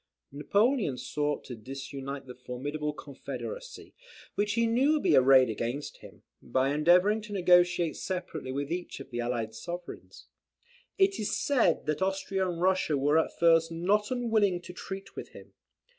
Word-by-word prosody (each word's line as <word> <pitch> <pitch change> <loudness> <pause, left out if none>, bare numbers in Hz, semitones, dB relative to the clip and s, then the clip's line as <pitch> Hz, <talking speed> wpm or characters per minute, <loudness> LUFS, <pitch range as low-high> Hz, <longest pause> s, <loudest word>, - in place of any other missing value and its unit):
Napoleon 200 - +1
sought 145 +4 -2
to 125 - -8
disunite 135 +3 -7
the 125 - -9
formidable 145 +5 -4
confederacy, 485 - -8 0.4
which 205 0 0
he 230 +1 +2
knew 255 +6 +3
would 305 - 0
be - - +4
arrayed 130 0 +6
against 120 +6 -4
him, - - -15 0.2
by 130 +1 0
endeavouring 180 +8 +4
to 210 0 -11
negotiate 175 -3 +3
separately 180 -7 -4
with 140 +3 -3
each 175 -3 -4
of 135 0 -11
the 120 - -4
allied 120 -2 -2
sovereigns. 175 +9 -8 0.7
It 390 0 +3
is 210 - -1
said 245 - +2
that 155 +3 -1
Austria 190 0 -1
and 170 -1 -4
Russia 185 -4 +2
were 145 +3 +3
at - - -2
first 165 -1 +4
not 200 +6 +1
unwilling 220 -7 +1
to 180 - -9
treat 195 +2 -8
with - - -8
him. - - -14
170 Hz, 160 wpm, -29 LUFS, 135-200 Hz, 0.7 s, arrayed